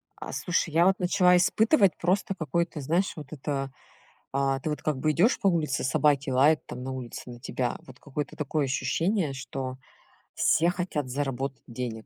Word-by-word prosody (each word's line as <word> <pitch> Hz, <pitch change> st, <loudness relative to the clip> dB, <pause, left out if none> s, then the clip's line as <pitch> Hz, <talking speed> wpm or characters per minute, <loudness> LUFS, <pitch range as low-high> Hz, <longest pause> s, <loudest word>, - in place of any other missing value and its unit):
А -, -, -8 dB
слушай, 175 Hz, -2 st, 0 dB
я 170 Hz, +2 st, +5 dB
вот 190 Hz, +1 st, +3 dB
начала 180 Hz, 0 st, +4 dB
испытывать 200 Hz, -, +3 dB
просто 190 Hz, +3 st, 0 dB
какое-то, 170 Hz, -2 st, -2 dB
знаешь, 170 Hz, +8 st, 0 dB
вот 150 Hz, -4 st, -8 dB
это: 135 Hz, -2 st, -3 dB, 0.6 s
а, 135 Hz, 0 st, +1 dB
ты 155 Hz, -, -3 dB
вот 150 Hz, -, -4 dB
как 150 Hz, -3 st, -1 dB
бы 155 Hz, +3 st, +1 dB
идёшь 195 Hz, -, +3 dB
по 200 Hz, -, +3 dB
улице, 160 Hz, -8 st, 0 dB
собаки 140 Hz, +1 st, +2 dB
лают 145 Hz, +4 st, +4 dB
там 125 Hz, -, -7 dB
на 130 Hz, +1 st, -4 dB
улице 125 Hz, -1 st, -7 dB
на 120 Hz, 0 st, -10 dB
тебя. 125 Hz, -1 st, -2 dB
Вот 130 Hz, -1 st, -13 dB
какое-то 145 Hz, 0 st, -5 dB
такое 150 Hz, 0 st, -1 dB
ощущение, 165 Hz, +5 st, 0 dB
что 130 Hz, 0 st, -5 dB, 0.6 s
все 165 Hz, +3 st, +3 dB
хотят 175 Hz, -6 st, -2 dB
заработать 135 Hz, -1 st, -3 dB
денег 115 Hz, -2 st, -5 dB
150 Hz, 175 wpm, -27 LUFS, 130-170 Hz, 0.6 s, я